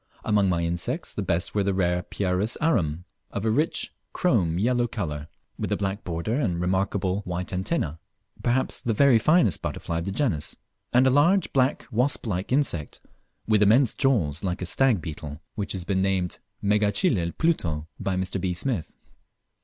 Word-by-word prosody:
Among 105 Hz, -3 st, +3 dB
my 85 Hz, -2 st, +1 dB
insects 85 Hz, 0 st, -2 dB
the -, -, -3 dB
best 85 Hz, 0 st, -1 dB
were 105 Hz, -, +2 dB
the 100 Hz, -1 st, 0 dB
rare 90 Hz, -1 st, +1 dB
Pieris 95 Hz, +4 st, -1 dB
arum, 90 Hz, -, +1 dB, 0.2 s
of 100 Hz, -, -4 dB
a 110 Hz, -, +3 dB
rich 150 Hz, +8 st, 0 dB, 0.2 s
chrome 95 Hz, -, +2 dB
yellow 120 Hz, +4 st, +2 dB
colour, 75 Hz, -10 st, -4 dB, 0.3 s
with -, -, -3 dB
a -, -, +2 dB
black 100 Hz, +1 st, -2 dB
border 90 Hz, -, -2 dB
and 90 Hz, -11 st, 0 dB
remarkable 95 Hz, +1 st, 0 dB
white 90 Hz, -2 st, -4 dB
antenna 90 Hz, -, -1 dB, 0.4 s
perhaps 125 Hz, +2 st, +1 dB
the 115 Hz, -2 st, -1 dB
very 130 Hz, -1 st, +5 dB
finest 130 Hz, -, +3 dB
butterfly 85 Hz, -1 st, -3 dB
of 85 Hz, -, -5 dB
the 95 Hz, -, -2 dB
genus; 95 Hz, -, -1 dB, 0.4 s
and 125 Hz, +2 st, +5 dB
a 130 Hz, -, +5 dB
large 170 Hz, +7 st, +3 dB
black 130 Hz, +1 st, +2 dB
wasp 125 Hz, +5 st, 0 dB
like 95 Hz, -2 st, -2 dB
insect, 125 Hz, -, 0 dB, 0.5 s
with 110 Hz, -1 st, +3 dB
immense 115 Hz, +4 st, +5 dB
jaws 100 Hz, -, +1 dB
like 90 Hz, -1 st, -2 dB
a -, -, -2 dB
stag 120 Hz, 0 st, +2 dB
beetle, 75 Hz, -2 st, -7 dB
which 100 Hz, -1 st, -3 dB
has 95 Hz, -2 st, -4 dB
been 95 Hz, +1 st, 0 dB
named 95 Hz, -2 st, 0 dB, 0.2 s
Megachile 105 Hz, -, +1 dB
Pluto 80 Hz, -, 0 dB
by 95 Hz, -, -1 dB
Mr. 95 Hz, 0 st, -2 dB
B. 90 Hz, -1 st, -1 dB
Smith. 105 Hz, -, -2 dB
95 Hz, 170 wpm, -25 LUFS, 85-120 Hz, 0.5 s, very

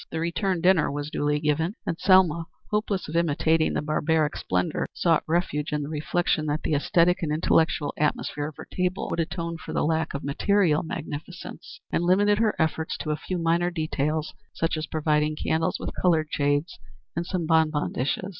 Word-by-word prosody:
The 160 Hz, -, -3 dB
return 170 Hz, +2 st, -1 dB
dinner 180 Hz, -4 st, +4 dB
was 145 Hz, +1 st, -4 dB
duly 150 Hz, 0 st, 0 dB
given, 160 Hz, +5 st, 0 dB
and -, -, -1 dB
Selma, 185 Hz, -4 st, +4 dB, 0.3 s
hopeless 210 Hz, -2 st, -1 dB
of 155 Hz, -, -6 dB
imitating 160 Hz, -1 st, +2 dB
the -, -, -1 dB
barbaric 155 Hz, 0 st, +1 dB
splendor, 90 Hz, -1 st, -1 dB
sought 165 Hz, -2 st, +3 dB
refuge 155 Hz, -3 st, 0 dB
in 150 Hz, -1 st, -1 dB
the 140 Hz, -, -5 dB
reflection 155 Hz, +1 st, 0 dB
that 150 Hz, +1 st, -1 dB
the -, -, -2 dB
æsthetic 170 Hz, +4 st, +3 dB
and 160 Hz, -3 st, -1 dB
intellectual 155 Hz, -1 st, +2 dB
atmosphere 150 Hz, 0 st, -1 dB
of 155 Hz, -, -9 dB
her -, -, -8 dB
table 180 Hz, +1 st, -1 dB
would -, -, -2 dB
atone 170 Hz, 0 st, -2 dB
for -, -, -7 dB
the -, -, +1 dB
lack 160 Hz, -1 st, 0 dB
of 140 Hz, -, -4 dB
material 160 Hz, +2 st, +2 dB
magnificence, 160 Hz, -, -7 dB
and 170 Hz, -, +1 dB
limited 205 Hz, +4 st, +3 dB
her 220 Hz, -2 st, +2 dB
efforts 160 Hz, 0 st, -1 dB
to 155 Hz, -, -3 dB
a -, -, +1 dB
few 185 Hz, +4 st, -4 dB
minor 170 Hz, +1 st, +1 dB
details 155 Hz, -2 st, -2 dB, 0.2 s
such 165 Hz, 0 st, 0 dB
as 155 Hz, -1 st, -4 dB
providing 150 Hz, -1 st, +1 dB
candles 160 Hz, +1 st, 0 dB
with -, -, -5 dB
colored 160 Hz, -4 st, +2 dB
shades 145 Hz, +3 st, 0 dB, 0.4 s
and 170 Hz, +1 st, -2 dB
some 180 Hz, -4 st, -2 dB
bonbon 160 Hz, -2 st, +2 dB
dishes. 145 Hz, +9 st, -2 dB
160 Hz, 185 wpm, -26 LUFS, 150-175 Hz, 0.4 s, dinner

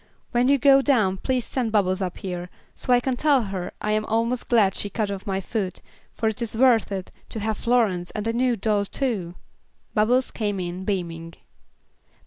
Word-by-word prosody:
When 245 Hz, +1 st, +2 dB
you 280 Hz, +1 st, +5 dB
go 275 Hz, 0 st, +6 dB
down 220 Hz, -9 st, +2 dB
please 250 Hz, +3 st, -1 dB
send 245 Hz, -4 st, -1 dB
Bubbles 195 Hz, -2 st, +1 dB
up 180 Hz, -2 st, -3 dB
here, 180 Hz, -2 st, -5 dB, 0.3 s
so -, -, -3 dB
I 245 Hz, -, +6 dB
can 255 Hz, +1 st, -1 dB
tell 280 Hz, -2 st, +3 dB
her 190 Hz, -3 st, -4 dB
I 210 Hz, -, -1 dB
am 215 Hz, 0 st, +1 dB
almost 230 Hz, +3 st, -1 dB
glad 215 Hz, -6 st, +4 dB
she 205 Hz, -, 0 dB
cut 200 Hz, -2 st, -3 dB
my 190 Hz, -1 st, 0 dB
foot, 195 Hz, -1 st, -3 dB, 0.4 s
for 225 Hz, -, 0 dB
it 220 Hz, +2 st, -2 dB
is 230 Hz, -1 st, -3 dB
worth 240 Hz, -4 st, +4 dB
it, 190 Hz, -2 st, -4 dB, 0.2 s
to 220 Hz, -, -4 dB
have 220 Hz, 0 st, -2 dB
Florence 215 Hz, -8 st, +1 dB
and 210 Hz, -1 st, -5 dB
a 230 Hz, -, 0 dB
new 245 Hz, 0 st, +2 dB
doll 205 Hz, -1 st, 0 dB
too." 200 Hz, -8 st, -2 dB, 0.6 s
Bubbles 245 Hz, +4 st, +2 dB
came 205 Hz, -3 st, -2 dB
in 180 Hz, +1 st, -4 dB
beaming. 165 Hz, -4 st, -3 dB
215 Hz, 190 wpm, -24 LUFS, 190-245 Hz, 0.6 s, go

